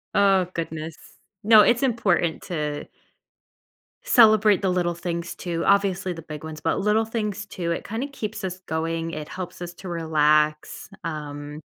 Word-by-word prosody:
Oh, 195 -2 +4
goodness. 160 -1 -5 0.5
No, 220 0 +8
it's 240 +4 +3
important 205 -9 +1
to 150 -5 -3 1.2
celebrate 215 - +5
the 195 - +1
little 175 -1 +1
things, 170 0 -4
too, 170 -2 -3
obviously, 195 -2 +2
the 165 - -9
big 155 -1 -9
ones, 155 -1 -7
but - - 0
little 210 +2 +2
things, 210 -2 -3
too, 170 -3 -4
it - - -3
kinda 230 +7 -3
keeps 215 -7 -6
us 185 0 -5
going, 165 0 -3
it 155 -2 -6
helps 185 -1 -7
us 175 0 -6
to 185 +1 -9
relax, 155 -2 +1
um, 150 -2 -6
175 Hz, 155 wpm, -24 LUFS, 160-205 Hz, 1.2 s, No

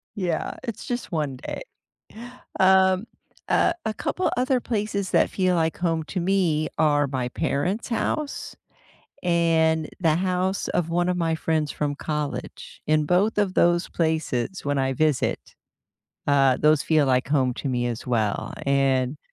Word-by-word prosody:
Yeah, 180 -5 -2
it's 230 -5 -6
just 245 -3 -4
one 150 -5 -1
day. - - -6 1.0
Um, 190 +1 +4 0.4
a 345 - +3
a 220 - -1
couple 370 - -1
other 255 0 +2
places 205 -4 -2
that - - +3
feel 185 -2 +1
like 160 -1 0
home 165 -2 0
to 180 +5 -4
me 175 -4 +1
are 145 -2 +3
my 130 -2 -2
parents' 165 - -2
house, 280 +6 -2 0.7
and 165 -2 +2
the 160 -3 +3
house 185 +1 -1
of 170 -1 -1
one 175 +1 +1
of 180 - 0
my 165 -2 0
friends 160 -2 -1
from 145 -1 -2
college. 150 -1 -5
In 155 0 +2
both 195 +6 +2
of 200 -3 +1
those 175 +1 +3
places 160 -1 -1
when 145 -1 0
I 135 0 +1
visit, 150 0 0 0.7
uh, 135 -3 +4
those 150 -1 +4
feel 155 -3 +3
like 130 0 +1
home 135 -3 +2
to 140 - -4
me 120 -1 0
as 120 0 -4
well, 110 -4 -1
and 135 0 +1
160 Hz, 150 wpm, -24 LUFS, 145-185 Hz, 1.0 s, Um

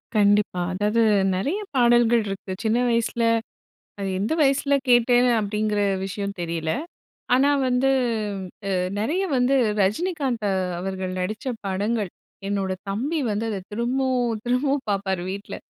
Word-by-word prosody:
கண்டிப்பா. 205 -3 +3
அதாது 210 +4 +1 0.3
நிறைய 285 - -1 0.2
பாடல்கள் 240 -2 +4
இருக்கு. 195 -1 -5
சின்ன 220 +1 +2
வயசில, 230 0 0 0.8
அது 195 -1 -2
எந்த 210 +9 0
வயசுல 280 0 +3
கேட்டேன் 245 +1 +5
அப்படிங்கிற 210 0 -1 0.3
விஷயம் 200 +1 -4
தெரியல. 165 -2 -2 0.6
ஆனா 270 +3 +4 0.2
வந்து 255 +2 +2 0.8
அ - - +1 0.2
நிறைய 315 - 0
வந்து 255 +2 +3 0.3
ரஜினிகாந்த் 255 - 0 0.3
அவர்கள் 190 0 -4
நடிச்ச 210 +6 -4 0.2
படங்கள். 200 +1 -1 0.4
என்னோட 195 -1 -1 0.2
தம்பி 270 +11 -1
வந்து 210 +2 -1
அத 205 -3 -3
திரும்பவும் 245 0 0
திரும்பவும் 270 +3 0
பார்ப்பாரு 195 -2 -1
வீட்ல. 200 +2 -6
220 Hz, 120 wpm, -24 LUFS, 200-250 Hz, 0.8 s, கேட்டேன்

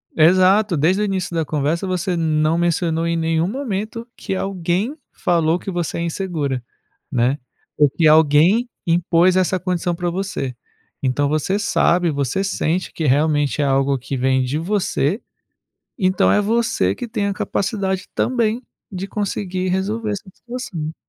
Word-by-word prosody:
Exato, 185 +4 +4
desde 180 +8 +2
o - - +2
início 190 -4 -2
da 160 -2 0
conversa, 155 +5 -1
você 180 0 -1
não 155 -1 +1
mencionou 170 -1 0
em 170 0 0
nenhum 165 +1 +1
momento 230 -1 -4
que 190 - -4
alguém 190 - -1 0.2
falou 170 0 +1
que - - -7
você 175 -3 -2
é - - -2
insegura, 160 -7 -2 0.5
né, 125 +2 +2 0.4
ou 145 -1 +5
que 160 +4 +2
alguém 160 - +5 0.2
impôs 170 +1 +3
essa 185 0 +2
condição 180 -1 -1
para 175 0 -2
você. 175 -8 -3 0.5
Então 135 +2 +1
você 155 +7 0
sabe, 175 -4 +2
você 140 +5 -1
sente 185 -2 -1
que 160 - -3
realmente 145 +1 +2
é - - +2
algo 135 0 +2
que 135 +2 -5
vem 130 +1 +2
de 130 +4 -2
você, 185 - 0 0.8
então 185 -2 +3
é 210 - +4
você 230 +3 +1
que 245 - -6
tem 205 -2 -1
a 200 - -1
capacidade, 190 -1 -2
também, 235 -1 0 0.3
de 190 0 -5
conseguir 190 -2 -2
resolver 210 +4 -1
essa 200 0 -6
situação. 195 -11 -6
175 Hz, 155 wpm, -20 LUFS, 155-195 Hz, 0.8 s, ou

